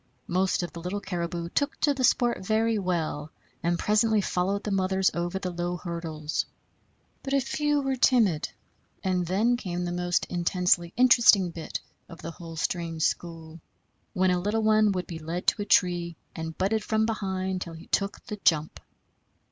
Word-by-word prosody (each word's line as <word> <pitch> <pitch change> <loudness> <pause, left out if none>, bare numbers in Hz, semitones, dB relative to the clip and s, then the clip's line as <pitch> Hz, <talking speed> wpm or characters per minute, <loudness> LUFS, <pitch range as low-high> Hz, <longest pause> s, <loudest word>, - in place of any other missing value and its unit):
Most 185 0 +1
of 175 - -5
the 170 - -7
little 180 +4 -3
caribou 170 -3 -4
took 285 +9 -1
to 290 - +4
the 265 -2 -3
sport 240 -3 +2
very 220 +2 +1
well, 160 -5 -2 0.3
and 170 0 +1
presently 215 +2 +3
followed 195 +1 0
the 210 - -3
mothers 190 0 +2
over 175 +2 -2
the 185 -1 -3
low 175 +1 -2
hurdles. 160 -3 -3 0.8
But 275 0 -1
a - - +4
few 295 +2 0
were 270 -1 0
timid; 225 - +3 0.5
and 180 -2 0
then 220 +7 +2
came 180 -5 -3
the 175 - -2
most 175 0 0
intensely 175 -1 +1
interesting 220 -7 +6
bit 165 -1 -5 0.3
of 170 - -11
the 165 - -4
whole 165 -1 -10
strange 165 0 -2
school, 165 -1 -3 0.5
when 185 0 +3
a 180 - +2
little 215 +3 0
one 215 -1 +4
would 180 -2 -2
be 165 -2 -7
led 165 +3 -4
to 210 - +2
a - - -2
tree 175 -3 +2 0.2
and 160 -1 -5
butted 210 +3 +1
from 220 0 +1
behind 190 -4 -2
till 170 - -5
he 160 - -11
took 200 0 -1
the 210 -3 -5
jump. 155 -1 +2
185 Hz, 175 wpm, -27 LUFS, 170-210 Hz, 0.8 s, interesting